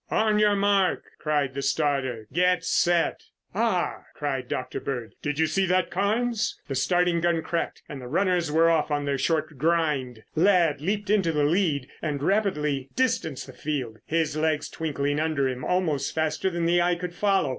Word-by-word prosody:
"On 215 -1 +2
your 210 -1 +4
mark!" 200 -1 +2 0.2
cried 145 -3 0
the 140 - -3
starter. 135 -5 0
"Get 180 +1 +2
set!" 175 -1 +2 0.3
"Ah!" 205 -4 0
cried 135 -4 -3
Dr. 125 +1 -3
Bird. 120 -5 -5
"Did 150 -1 -2
you 160 - +3
see 190 +5 +1
that 180 -1 +1
Carnes?" 220 +4 0
The 140 - -3
starting 170 +6 +2
gun 170 -1 +1
cracked 170 - -3
and 140 -2 -7
the 125 - -8
runners 180 +1 +1
were 165 +2 +4
off 165 -2 +2
on 145 -1 -1
their 140 -1 -1
short 155 -3 -1
grind. 150 -7 0
Ladd 170 -4 +3
leaped 205 +4 -1
into 195 -6 +3
the 150 -2 +1
lead 150 -4 +1
and 145 -3 -2
rapidly 150 -9 0
distanced 230 - 0
the - - -12
field, 130 -7 -4
his 160 -1 0
legs 155 -1 0
twinkling 145 -2 -2
under 155 -4 +1
him 130 -1 -4
almost 160 -7 0
faster 160 +4 0
than 170 -2 -2
the 175 +1 +3
eye 175 0 +2
could 175 0 -5
follow. 195 -5 +1
160 Hz, 175 wpm, -26 LUFS, 145-180 Hz, 0.3 s, your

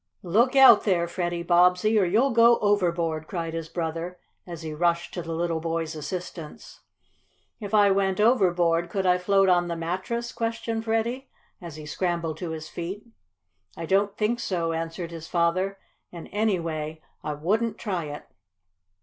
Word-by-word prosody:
"Look 230 +9 +2
out 260 -5 +8
there, 175 -4 +1
Freddie 175 0 -3
Bobbsey, 180 +5 +4
or 195 - +3
you'll 225 +10 +2
go 235 0 +6
overboard!" 170 -6 0
cried 165 -3 -4
his 165 -1 -5
brother, 165 +1 -4 0.3
as 170 -2 -8
he 155 -1 -5
rushed 170 +2 0
to 175 - -4
the 165 0 -5
little 165 -1 -1
boy's 165 0 -3
assistance. 160 +1 -7 0.8
"If 210 -1 -3
I 205 -1 +5
went 195 -1 +1
overboard, 175 -7 +3
could 195 +1 -2
I 180 0 +3
float 195 +1 +3
on 175 -1 +3
the 170 - -3
mattress?" 190 +8 -3
questioned 230 0 -3
Freddie, 230 +4 -1 0.3
as 170 -4 -8
he 155 -1 -9
scrambled 170 0 -2
to 175 - -5
his 160 -1 -6
feet. 185 +6 -6 0.7
"I 165 - -4
don't 200 +3 +1
think 225 +3 0
so," 175 -7 -1
answered 165 +1 -4
his 165 -1 -8
father. 185 +3 0 0.3
"And, 170 -2 -9
anyway, 165 -7 -2 0.2
I 150 - -3
wouldn't 210 +9 -1
try 185 -7 -3
it." 145 0 -8
175 Hz, 160 wpm, -25 LUFS, 165-205 Hz, 0.8 s, out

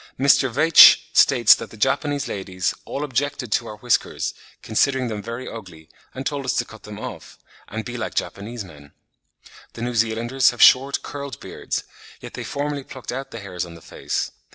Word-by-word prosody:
Mr. 135 -1 +4
Veitch 155 +7 +8
states 120 -3 +6
that - - -5
the 110 - -14
Japanese 140 +4 0
ladies 95 -2 -3
"all 140 - -4
objected 140 -3 -2
to - - 0
our 105 - -8
whiskers, 120 +3 -1 0.3
considering 130 +3 +1
them 105 -2 -4
very 115 +4 -6
ugly, 85 -8 -10 0.3
and 130 +1 -6
told 145 -1 -2
us 130 - -1
to 125 - 0
cut 110 -2 -14
them 105 -1 -10
off, - - -9 0.3
and 110 +1 -6
be 120 0 -6
like 110 -2 -5
Japanese 110 +3 -4
men." 75 -6 -15 0.8
The 115 - -7
New 120 0 -2
Zealanders 115 +3 +2
have 120 - -6
short, 135 +2 +5
curled 140 -1 -7
beards; - - -5 0.4
yet - - -10
they - - -6
formerly 145 0 -3
plucked 130 -1 -8
out 135 +2 -5
the 115 - -8
hairs 95 -3 -5
on 85 -1 -9
the - - -12
face. - - -4
120 Hz, 185 wpm, -22 LUFS, 105-135 Hz, 0.8 s, Veitch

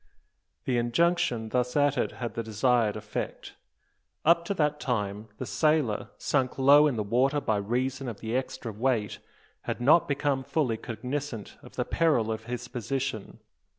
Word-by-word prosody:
The 125 -2 +1
injunction 120 -2 +1
thus 125 +1 0
uttered 145 -2 +2
had 120 -2 -5
the 115 - -2
desired 110 0 +1
effect. 105 -1 -5 0.7
Up 170 +1 +5
to 200 - -2
that 150 -3 +1
time 105 -3 -2
the - - -4
sailor, 150 -9 +1
sunk 130 -3 0
low 140 +3 +7
in 140 - 0
the 110 - -1
water 130 +7 +2
by 110 -6 0
reason 130 +6 -1
of 115 -4 -5
the 115 +1 -3
extra 130 -3 -3
weight, 110 -1 -1 0.5
had - - -3
not 145 +7 +5
become 140 -2 0
fully 130 -6 0
cognisant 125 +1 -5
of - - -14
the - - -1
peril 135 -10 +2
of 110 0 -5
his 125 0 -5
position. 125 -2 -4
125 Hz, 155 wpm, -28 LUFS, 110-145 Hz, 0.7 s, low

